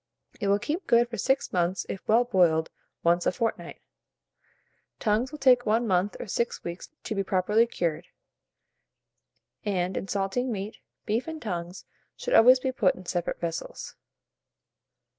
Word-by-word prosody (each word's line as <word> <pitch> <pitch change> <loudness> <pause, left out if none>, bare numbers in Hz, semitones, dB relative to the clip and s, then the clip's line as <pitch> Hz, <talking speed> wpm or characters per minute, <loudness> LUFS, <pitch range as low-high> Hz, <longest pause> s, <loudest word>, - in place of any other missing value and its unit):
It 205 - -1
will 200 0 +4
keep 310 - -4
good 235 0 +4
for 235 - -5
6 270 +4 0
months 175 0 0
if 195 - -5
well 230 +3 +5
boiled 175 -9 +2 0.3
once 175 +1 +3
a - - +4
fortnight. 225 +3 -3 1.1
Tongues 225 +4 0
will 300 - -7
take 255 -4 +4
1 225 +3 +2
month 190 -1 +1
or - - -5
6 235 +4 -2
weeks 170 +1 -7
to - - -3
be 195 -1 -1
properly 205 +5 +2
cured; 170 -5 -2 1.6
and, 185 -3 -1
in - - -3
salting 200 +6 -1
meat, 205 0 -5 0.3
beef 230 +5 -1
and 320 -1 -5
tongues 180 - -5 0.3
should - - -3
always 255 +3 +7
be 260 0 -1
put 215 -7 +2
in 185 - -12
separate 175 -1 -2
vessels. 165 -1 -5
205 Hz, 155 wpm, -27 LUFS, 180-240 Hz, 1.6 s, always